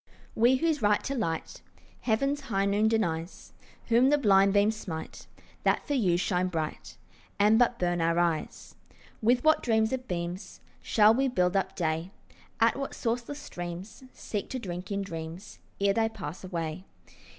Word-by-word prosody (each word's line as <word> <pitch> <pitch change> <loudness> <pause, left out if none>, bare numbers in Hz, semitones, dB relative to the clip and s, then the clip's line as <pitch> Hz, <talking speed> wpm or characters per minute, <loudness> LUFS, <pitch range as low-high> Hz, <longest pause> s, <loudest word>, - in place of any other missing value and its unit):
We 240 +4 +4
whose 315 0 0
right 210 -1 +2
to 275 - -3
light 165 -11 -3 0.4
Heaven's 275 +5 0
high 200 -7 -1
noon 205 +2 +2
denies, 175 -6 -2 0.4
Whom 240 +3 +5
the 295 - +4
blind 195 -6 +4
beams 205 +2 +3
smite 165 -7 -7 0.3
That - - +1
for 290 - -2
you 190 -10 +2
shine 180 0 0
bright, 160 -4 -4 0.4
And 210 +2 +5
but 245 -1 +3
burn 175 -3 0
our 165 +1 +1
eyes, 170 -2 -1 0.5
With 245 +3 +3
what 315 0 +4
dreams 220 0 +1
of 255 -1 -4
beams 175 +2 -5 0.2
Shall 215 0 +5
we 270 +3 +1
build 180 -7 +1
up 190 -1 0
day, 165 0 -1 0.5
At 230 +3 +3
what 275 0 -4
sourceless 240 +4 -2
streams 175 -5 -8
Seek 205 -2 -5
to 260 - -3
drink 180 -4 -6
in 200 0 -1
dreams 165 +2 -8 0.2
Ere 200 0 +3
they 225 0 +1
pass 165 -5 -8
away? 170 -1 -4
200 Hz, 160 wpm, -28 LUFS, 175-235 Hz, 0.5 s, Whom